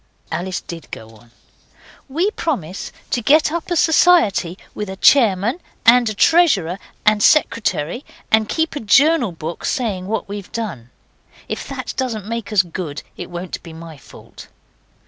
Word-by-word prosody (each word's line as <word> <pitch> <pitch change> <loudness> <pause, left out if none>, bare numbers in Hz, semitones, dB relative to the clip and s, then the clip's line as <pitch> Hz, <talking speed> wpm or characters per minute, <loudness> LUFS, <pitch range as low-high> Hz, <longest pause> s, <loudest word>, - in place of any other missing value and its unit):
Alice 185 +1 -3
did 165 -2 -10
go 110 0 -9
on. 115 +2 -20 0.8
'We 340 +10 0
propose 195 - -4 0.2
to 245 - 0
get 300 +6 +4
up 340 +1 -4
a 350 - 0
society, 315 - +3 0.2
with 210 -2 -5
a 190 - -5
chairman 225 - +3 0.3
and 240 0 +6
a 215 - -5
treasurer 200 - +3 0.3
and 210 -1 +4
secretary, 230 - +2 0.3
and 220 -1 +3
keep 320 -1 -1
a - - -2
journal 275 - +3
book 165 0 -7
saying 205 -9 -2
what 220 +1 -2
we've 200 -1 -7
done. 170 - -5 0.6
If - - -5
that - - -5
doesn't 230 -6 -2
make 230 0 -5
us 200 -3 +4
good 165 -4 -6
it - - -8
won't 175 +1 -6
be 165 - -11
my 165 0 -10
fault. - - -14
210 Hz, 155 wpm, -19 LUFS, 175-265 Hz, 0.8 s, and